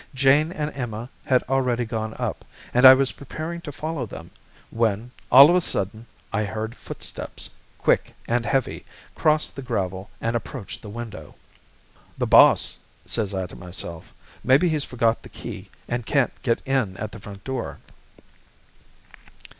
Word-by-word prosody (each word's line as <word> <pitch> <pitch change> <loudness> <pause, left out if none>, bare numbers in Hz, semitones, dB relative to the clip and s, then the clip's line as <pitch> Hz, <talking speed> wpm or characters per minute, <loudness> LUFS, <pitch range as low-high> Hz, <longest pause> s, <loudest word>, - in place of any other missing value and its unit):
Jane 140 +4 +4
and 150 -4 -4
Emma 120 -1 -5 0.2
had 130 -2 +3
already 125 -2 +1
gone 110 -1 -4
up, - - -3 0.3
and 125 +2 +8
I 130 - +11
was 135 0 +2
preparing 160 +5 -6
to 150 - -7
follow 150 -3 -4
them, 85 -4 -10 0.4
when, 115 +1 0 0.2
all 135 +3 +11
of - - +4
a 180 - +4
sudden, 110 - -2 0.3
I 105 0 +1
heard 110 +2 -4
footsteps, - - -6 0.3
quick - - +1
and 120 0 +1
heavy, 135 +1 -1 0.3
cross 155 0 +3
the 135 - -8
gravel 95 -6 -3
and 115 +1 -1
approach 120 -1 -5
the 105 - -9
window. 115 0 -8 0.8
"'The - - 0
boss,' - - +6 0.3
says 105 -4 -1
I 95 -1 -1
to - - -11
myself; 85 -2 -7 0.3
'maybe 135 +8 +5
he's 155 -3 0
forgot 115 -2 +1
the - - -12
key - - -8 0.2
and 120 0 -2
can't 135 +2 +1
get 120 -3 0
in 130 -9 0
at 110 0 -5
the 110 - -9
front 100 0 -11
door.' 130 -2 -4
120 Hz, 155 wpm, -24 LUFS, 110-135 Hz, 0.8 s, I